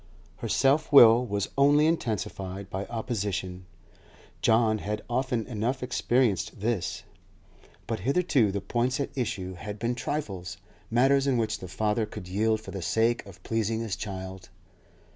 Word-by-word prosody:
Her -, -, -5 dB
self 145 Hz, +4 st, +2 dB
will 120 Hz, -3 st, +8 dB
was 100 Hz, -1 st, -2 dB
only 145 Hz, +2 st, +5 dB
intensified 100 Hz, -, -2 dB
by 95 Hz, +1 st, -4 dB
opposition. 100 Hz, -6 st, -3 dB, 0.7 s
John 110 Hz, -1 st, +3 dB
had 105 Hz, +1 st, -4 dB
often 120 Hz, -2 st, -1 dB
enough 125 Hz, +3 st, -2 dB
experienced 125 Hz, -5 st, 0 dB
this, 110 Hz, -3 st, -2 dB, 0.8 s
but -, -, -3 dB
hitherto 135 Hz, -, +2 dB
the 100 Hz, 0 st, -3 dB
points 120 Hz, +6 st, -1 dB
at 140 Hz, -, -3 dB
issue 95 Hz, -8 st, -3 dB
had 105 Hz, +3 st, -7 dB
been 115 Hz, +3 st, -1 dB
trifles, 100 Hz, -, -4 dB, 0.3 s
matters 135 Hz, +4 st, +3 dB
in 130 Hz, -3 st, +2 dB
which 115 Hz, -2 st, -1 dB
the 95 Hz, -, -7 dB
father 105 Hz, +4 st, 0 dB
could 90 Hz, -, -9 dB
yield 110 Hz, +3 st, +1 dB
for -, -, -9 dB
the 95 Hz, -, -5 dB
sake 115 Hz, +6 st, +1 dB
of 95 Hz, -1 st, -14 dB
pleasing 115 Hz, 0 st, -1 dB
his 110 Hz, -4 st, -2 dB
child. 95 Hz, -2 st, -7 dB
110 Hz, 145 wpm, -27 LUFS, 100-125 Hz, 0.8 s, will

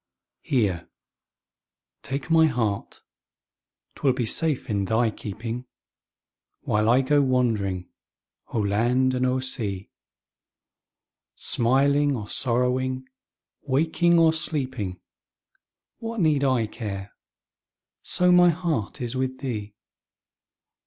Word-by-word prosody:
Here, 100 Hz, -10 st, -1 dB, 1.1 s
take 140 Hz, +4 st, -5 dB
my 160 Hz, -1 st, +6 dB
heart 115 Hz, -7 st, -2 dB, 0.9 s
'twill 135 Hz, -3 st, +1 dB
be 125 Hz, -2 st, -2 dB
safe 155 Hz, +4 st, +1 dB
in 100 Hz, -3 st, -1 dB
thy 110 Hz, +3 st, +1 dB
keeping, 115 Hz, +5 st, -6 dB, 0.9 s
While 105 Hz, +1 st, +1 dB
I 125 Hz, +3 st, +5 dB
go 145 Hz, +2 st, +3 dB
wandering 110 Hz, -9 st, 0 dB, 0.6 s
o'er 105 Hz, -3 st, 0 dB
land 125 Hz, +5 st, +2 dB
and 130 Hz, 0 st, +1 dB
o'er 130 Hz, 0 st, 0 dB
sea; 105 Hz, -7 st, -3 dB, 1.4 s
Smiling 140 Hz, +4 st, +2 dB
or 105 Hz, -4 st, -6 dB
sorrowing, 130 Hz, +2 st, 0 dB, 0.5 s
waking 160 Hz, +5 st, +2 dB
or 165 Hz, -1 st, +5 dB
sleeping, 130 Hz, -, 0 dB, 1.0 s
What 230 Hz, 0 st, -5 dB
need 155 Hz, -5 st, +2 dB
I 130 Hz, -4 st, +2 dB
care, 100 Hz, -3 st, -6 dB, 0.9 s
so 180 Hz, 0 st, +2 dB
my 180 Hz, 0 st, +6 dB
heart 165 Hz, -, -2 dB
is 120 Hz, +1 st, -3 dB
with 130 Hz, 0 st, -2 dB
thee? 105 Hz, -6 st, -5 dB
130 Hz, 100 wpm, -25 LUFS, 110-140 Hz, 1.4 s, my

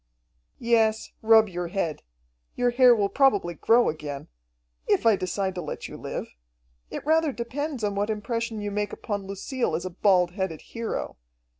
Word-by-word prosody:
"Yes, 225 Hz, -2 st, +2 dB
rub 220 Hz, 0 st, +6 dB
your 175 Hz, -2 st, -4 dB
head. 170 Hz, -4 st, -2 dB, 0.5 s
Your 245 Hz, 0 st, +2 dB
hair 250 Hz, 0 st, +6 dB
will 205 Hz, -3 st, +1 dB
probably 205 Hz, -8 st, +2 dB
grow 230 Hz, +8 st, +3 dB
again 150 Hz, -2 st, -5 dB, 0.6 s
if -, -, +2 dB
I 225 Hz, -2 st, +6 dB
decide 190 Hz, +1 st, -2 dB
to 180 Hz, -, -4 dB
let 155 Hz, -, -6 dB
you -, -, -10 dB
live. -, -, -5 dB, 0.6 s
It -, -, -6 dB
rather 320 Hz, 0 st, +3 dB
depends 260 Hz, +2 st, -4 dB
upon 205 Hz, -1 st, 0 dB
what 205 Hz, +2 st, 0 dB
impression 225 Hz, +1 st, -3 dB
you 205 Hz, 0 st, -3 dB
make 205 Hz, 0 st, -2 dB
upon 205 Hz, -3 st, -4 dB
Lucille 200 Hz, -, -2 dB
as 175 Hz, +3 st, -3 dB
a 185 Hz, -, -4 dB
bald 180 Hz, -1 st, +3 dB
headed 185 Hz, -4 st, -3 dB
hero. 230 Hz, -, -5 dB
210 Hz, 165 wpm, -26 LUFS, 185-235 Hz, 0.6 s, rub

